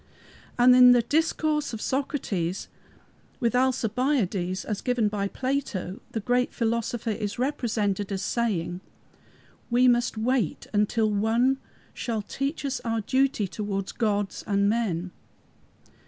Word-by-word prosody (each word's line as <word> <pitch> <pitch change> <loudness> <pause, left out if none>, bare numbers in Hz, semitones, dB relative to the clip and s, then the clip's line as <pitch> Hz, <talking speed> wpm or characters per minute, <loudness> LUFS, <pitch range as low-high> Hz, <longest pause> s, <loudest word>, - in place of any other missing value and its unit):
And 250 +1 +7
in 250 0 +9
the 240 -1 +4
discourse 305 +1 0
of 225 - -4
Socrates 210 - -2 0.7
with 235 -2 +1
Alcibiades, 235 -7 0
as 210 -2 -3
given 245 -4 +1
by 200 -1 -1
Plato, 255 -7 -3
the 225 - -1
great 245 +3 0
philosopher 230 0 -1
is 205 -1 -3
represented 215 -7 -1
as 195 -1 -2
saying, 185 -7 -1 0.9
"We 250 +1 +4
must 240 -2 +2
wait 230 -4 0 0.2
till 220 -1 +1
One 230 +6 +2 0.3
shall 225 -4 -3
teach 275 +7 -3
us 275 -1 -1
our 225 -1 -2
duty 260 -2 +1
towards 195 0 -3
gods 205 -3 -1
and 200 0 +2
men." 190 -6 -1
230 Hz, 125 wpm, -26 LUFS, 205-250 Hz, 0.9 s, in